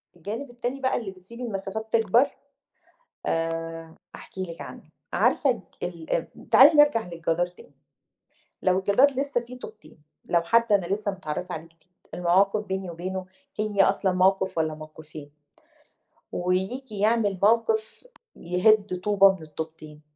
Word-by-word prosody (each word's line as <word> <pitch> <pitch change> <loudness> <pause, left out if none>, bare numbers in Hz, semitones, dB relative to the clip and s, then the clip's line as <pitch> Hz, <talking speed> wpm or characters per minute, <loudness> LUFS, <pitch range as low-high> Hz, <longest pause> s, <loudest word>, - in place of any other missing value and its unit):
الجانب 215 - -6
التاني 245 +2 -4
بقى 260 -1 +1
اللي 205 -5 -5
بتسينوا 235 +7 -9
المسافات 205 +2 -4
تكبر 230 +4 +4 1.0
آآ 165 0 -3 0.2
احكي 190 - -8
لِك 170 -2 -7
عنّه، - - -9 0.3
عارفة 250 -9 +2 0.2
ال 170 -2 -3
م - - -14
تعالي 295 +4 +7
نرجع 230 -9 +1
للجدار 170 0 -1
تاني 180 -4 -17 0.9
لو 185 0 +3
الجدار 205 +9 +4
لسّه 275 -1 -1
في 240 +1 -10
طوبتين، 210 -11 -13 0.3
لو 170 -1 +3
حد 230 +4 +2
أنا 190 -4 +3
لسّه 200 +2 -1
متعرفة 180 0 -5
عليه 160 - -6
جديد 165 +2 -25 0.3
المواقف 195 +4 +2
بيني 190 -1 -3
وبينه 185 +2 -5 0.3
هي 210 -2 +2
أصلًا 190 -1 +2
موقف 190 -1 +2
والّا 155 -1 0
موقوفين، 155 -1 -11 1.0
وييجي 195 +6 -2
يعمل 210 -3 +2
موقف 220 - +1 0.3
يهدّ 185 +1 +2
طوبة 195 -2 +6
من 185 -4 -10
الطوبتين 155 -1 -8
190 Hz, 135 wpm, -25 LUFS, 170-220 Hz, 1.0 s, تعالي